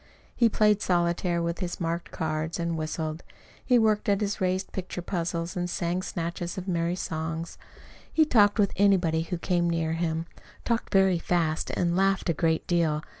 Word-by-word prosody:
He 235 -2 +4
played 210 -1 +3
solitaire 175 -1 +1
with 170 0 -2
his 180 -3 -4
marked 170 0 -2
cards 160 +1 -3
and 170 0 -1
whistled. 155 0 -3 0.4
He 250 - +4
worked 215 -2 +2
at 200 -1 +3
his 205 -1 -2
raised 185 +1 0
picture 180 -1 -5
puzzles 170 -1 -3
and 175 -1 -2
sang 175 +1 -1
snatches 170 +1 -4
of 185 +1 -5
merry 170 -1 0
song. 160 -1 -3 0.7
He 315 - +4
talked 210 -7 +4
with 200 -3 +2
anybody 180 -5 +3
who 175 +2 -3
came 175 0 0
near 165 -1 0
him 165 -1 -1 0.4
talked 235 -1 -1
very 190 -3 +4
fast 165 -2 0
and 170 -1 0
laughed 195 -1 +2
a - - 0
great 160 +1 0
deal. 160 -3 +1
175 Hz, 175 wpm, -27 LUFS, 165-190 Hz, 0.7 s, He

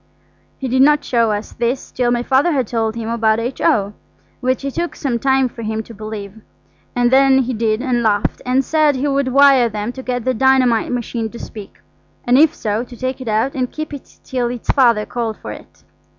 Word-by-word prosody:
He 265 - -4
did 260 +1 +2
not 295 +2 +4
show 230 -2 +1
us 210 +1 -4
this 240 +2 -2
till 245 -1 0
my 240 0 0
Father 275 +7 +2
had 265 -4 +1
told 225 0 -2
him 230 -1 -5
about 225 -1 +1
H.O., 220 -4 0 0.5
which 255 +2 -1
it 275 - -3
took 345 0 -3
some 250 -5 -2
time 265 +1 +2
for 235 -1 -10
him 220 0 -3
to 230 - -12
believe, 215 -1 -8 0.5
and 245 0 +2
then 270 0 +5
he 255 +1 -3
did 220 +1 0
and 250 -3 0
laughed, 205 -3 0
and 255 +1 +1
said 310 -2 +2
he 265 +3 -1
would 275 -1 0
wire 270 -2 +5
them 210 +1 -4
to 260 - -8
get 245 -2 -3
the 255 - +1
dynamite 255 -2 +3
machine 235 -2 -3
to 235 - -10
speak, 210 -4 -10 0.5
and 245 +2 +4
if 315 +1 +5
so, 215 0 -2
to 245 -1 -12
take 260 +1 -3
it 255 - -7
out 220 +6 0
and 255 -4 -2
keep 310 -1 -6
it 280 - -11
till 250 -2 -2
its 245 -1 -2
Father 235 -5 +3
called 230 -3 -3
for - - -8
it. - - -13
245 Hz, 215 wpm, -18 LUFS, 225-265 Hz, 0.5 s, then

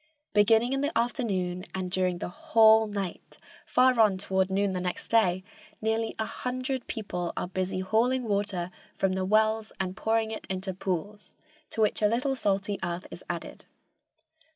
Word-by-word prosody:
Beginning 225 +4 +4
in 270 - 0
the 290 -1 0
afternoon 195 -7 -1
and 185 -1 -3
during 185 -1 +1
the 175 - -4
whole 220 +4 +5
night, 200 -4 -5 0.3
far 255 -1 +4
on 210 -4 +5
toward 190 0 0
noon 195 0 +1
next 180 -1 -3
day, 185 -5 +3 0.4
nearly 220 +1 -1
a 220 - -1
hundred 255 +2 -3
people 180 -6 -3
are - - -1
busy 185 0 -2
hauling 240 +6 +2
water 200 -4 -1 0.3
from 195 -1 +1
the 190 0 -1
wells 220 +2 +2
and 185 -1 -2
pouring 220 +1 0
it 220 - -6
into 190 0 -3
pools, 190 +3 -4 0.3
to 225 - -3
which 210 0 +2
a 210 - +5
little 255 +5 0
salty 200 -3 0
earth 175 0 -3
is - - -9
added. - - -6
205 Hz, 160 wpm, -28 LUFS, 185-225 Hz, 0.4 s, whole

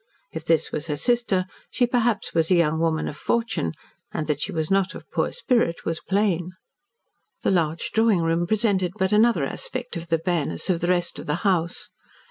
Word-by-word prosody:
If - - -6
this 165 -1 +2
was 150 - -3
her 150 - -1
sister, 230 - +2 0.2
she 250 - +2
perhaps 240 -3 0
was 165 -1 +2
a 185 - +5
young 160 -2 +2
woman 160 -1 0
of - - -5
fortune, 225 - -1 0.4
and 155 - -2
that 150 -1 -1
she - - -2
was 160 -2 -2
not 195 -1 +2
of - - -10
poor - - 0
spirit 240 - 0
was 165 -1 -1
plain. 185 -3 0 0.9
The - - +2
large 165 -3 0
drawing 220 -6 +3
room 165 +1 +1
presented 200 -4 +1
but 190 +1 +1
another 210 -6 +4
aspect 250 - -5
of 170 0 -5
the 165 0 +2
bareness 165 - -1
of 170 - -1
the 175 - 0
rest 175 -1 +1
of - - -9
the 150 - +1
house. 175 -3 0
175 Hz, 195 wpm, -24 LUFS, 165-210 Hz, 0.9 s, a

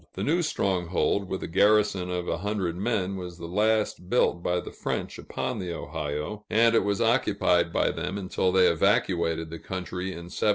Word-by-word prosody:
The - - -3
new 170 +4 +2
stronghold, 95 - 0
with 95 - -3
a - - -3
garrison 100 0 +3
of 90 -1 -3
a - - -1
hundred 100 -3 -2
men, 100 -1 -1
was 90 -2 -7
the 85 - -8
last 105 0 0
built 85 -7 +2
by 90 +1 0
the - - -7
French - - -4
upon 125 -4 -4
the 90 -2 -4
Ohio, 75 +7 -4
and 115 +1 +4
it 115 - +4
was 100 +1 0
occupied 100 -7 +2
by - - +2
them 95 - -4
until 95 -1 0
they 95 0 +5
evacuated 85 -2 +1
the 85 - -6
country 90 0 -5
in 85 -2 -7
1763. - - +1
95 Hz, 190 wpm, -27 LUFS, 85-105 Hz, -, they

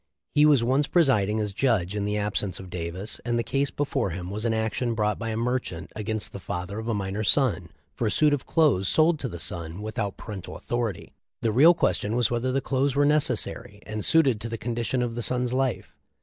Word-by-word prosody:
He 150 +1 +6
was 140 -6 +5
once 135 +4 +2
presiding 110 - +3
as 105 -2 -2
judge 105 -6 +1
in 100 -1 -1
the 105 +1 -1
absence 105 -3 -2
of 95 -1 -10
Davis, 90 +4 -4
and 120 0 0
the 115 - 0
case 140 +2 0
before 140 -6 -1
him 90 +2 -5
was 105 +3 -4
an 115 - +2
action 110 +2 -1
brought 105 -1 0
by 115 0 -3
a 110 - -2
merchant 120 -8 -2
against 110 0 -3
the 100 - -7
father 90 +4 -5
of 110 - -6
a 115 - 0
minor 100 +1 -2
son 105 - +2 0.2
for 115 - -1
a - - 0
suit 150 +4 +3
of 140 - -2
clothes 140 - +3
sold 160 - +3
to 130 - -3
the 85 - -7
son 85 +1 -6
without 105 -2 -3
parental 100 -4 -7
authority. 120 -6 -3 0.3
The 115 - +2
real 155 +10 +7
question 110 -8 0
was 120 -1 +1
whether 120 +2 0
the 135 +1 0
clothes 135 +1 0
were 145 0 +4
necessary, 145 -8 +1
and 105 -1 -4
suited 135 - +3
to 115 - -4
the 115 - -4
condition 120 +2 -1
of 120 -1 -2
the 120 - -4
son's 125 +1 -1
life. 130 -2 -1
115 Hz, 220 wpm, -26 LUFS, 100-130 Hz, 0.3 s, real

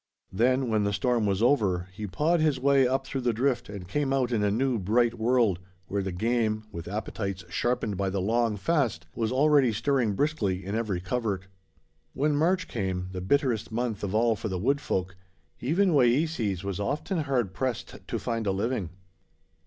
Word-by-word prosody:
Then, 130 +5 +2
when 110 -2 +1
the 100 0 0
storm 120 0 +1
was 100 +2 +1
over, 100 -9 +2
he 105 +1 -5
pawed 155 - +1
his 155 -4 +2
way 135 -1 +4
up 135 +1 0
through 135 0 -3
the 120 -1 +1
drift 125 +1 0
and 100 -3 -7
came 140 +7 -1
out 130 -2 +1
in 110 -3 +1
a 105 - +3
new, 120 +3 +1
bright 115 +5 +2
world, 115 -5 +2 0.3
where 100 +1 -2
the 95 0 -3
game, 110 +2 0
with 85 -4 -7
appetites 100 -2 -4
sharpened 105 +1 -1
by 100 0 0
the 95 +1 -2
long 115 +2 +1
fast, 120 - 0
was 115 0 -1
already 140 -1 +4
stirring 120 -1 +1
briskly 100 -8 -1
in 100 - -4
every 110 -5 -1
covert. 100 -1 -2 0.7
When 145 +2 +1
March 180 +4 +2
came, 95 -4 -3
the 90 -1 -5
bitterest 125 +1 +1
month 115 -2 -2
of 100 +1 -2
all 115 0 +3
for 110 - -4
the 95 - -2
Wood 140 +9 +1
Folk, 95 -5 -2 0.4
even 180 +9 +2
Wayeeses 120 - +2
was 100 -1 -3
often 150 - -1
hard 130 -10 0
pressed 125 +1 -3
to 115 - -2
find 115 0 -2
a - - +3
living. 100 -1 -1
115 Hz, 185 wpm, -27 LUFS, 100-135 Hz, 0.7 s, way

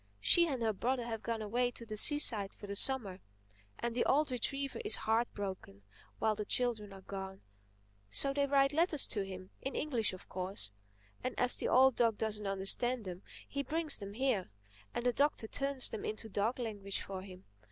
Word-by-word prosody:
She 340 - +5
and 260 -6 -2
her 220 -1 +1
brother 245 +4 -1
have 225 -2 -4
gone 230 -2 -3
away 245 +4 0
to 235 -1 -9
the 215 -1 -6
seaside 215 -5 +5
for - - -10
the 200 0 -5
Summer; 205 -6 +3 0.6
and 235 0 -3
the 240 - +1
old 290 +1 +2
retriever 275 - -2
is 420 - +3
heart 225 +2 0
broken 190 - -6 0.3
while 220 -1 +1
the 210 0 -4
children 220 -2 -1
are 195 -1 -11
gone. 190 0 -7 0.7
So 275 - +3
they 280 0 +1
write 275 0 +3
letters 320 -2 +1
to 205 -3 0
him—in 190 +7 -7
English 240 -9 0
of 185 - -11
course. 185 - -4 0.5
And 255 - -3
as 250 0 +7
the - - -2
old 265 -1 +5
dog 230 -3 +3
doesn't 210 -2 -2
understand 205 +5 0
them, 180 0 -6 0.3
he 280 - -3
brings 315 +2 0
them 200 -1 -7
here, 240 - 0 0.4
and 240 - -4
the 245 - +3
Doctor 285 -4 +1
turns 275 +1 0
them 215 - -6
into 215 +1 -4
dog 210 +5 0
language 205 -5 -3
for 190 -1 -6
him. 185 -1 -12
225 Hz, 190 wpm, -34 LUFS, 200-265 Hz, 0.7 s, as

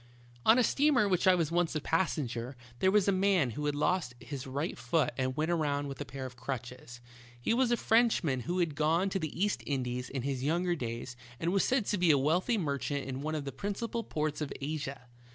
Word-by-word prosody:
On 225 - +8
a 250 - +5
steamer 280 -1 +3
on 200 - -1
which 180 0 +2
I 185 - +7
was 165 -3 0
once 175 -1 +1
a - - +1
passenger, 135 -7 -1 0.2
there 190 - +4
was 205 0 +3
a - - +5
man 185 -8 +2
who 150 +6 -3
had 145 - 0
lost 150 -4 0
his 135 +3 -7
right 140 +5 -2
foot 130 +1 0
and 130 +1 -2
went 155 +3 +1
around 145 -4 0
with 135 -2 -7
a - - -3
pair 130 +3 -6
of 125 -1 -8
crutches. 125 -1 -6 0.4
He 120 - +1
was 250 0 +3
a 240 - +3
Frenchman 220 - +2
who 170 +10 -3
had 170 -4 +1
gone 160 +6 +2
to 195 - 0
the 155 -1 -5
East 205 +1 +1
Indies 125 -2 -2
in 135 -3 -4
his 135 -2 -2
younger 175 +4 +1
days 120 -2 -5 0.2
and 165 +1 0
was 195 - +3
said 255 -4 +1
to 205 - 0
be 175 -2 +3
a 145 - +6
wealthy 175 - +2
merchant 140 -4 -2
in 135 0 -4
one 155 +2 -2
of 150 -2 -3
the 140 - -4
principal 225 +5 -3
ports 155 -4 -2
of 150 - -3
Asia. 140 -2 -4
155 Hz, 230 wpm, -31 LUFS, 135-185 Hz, 0.4 s, On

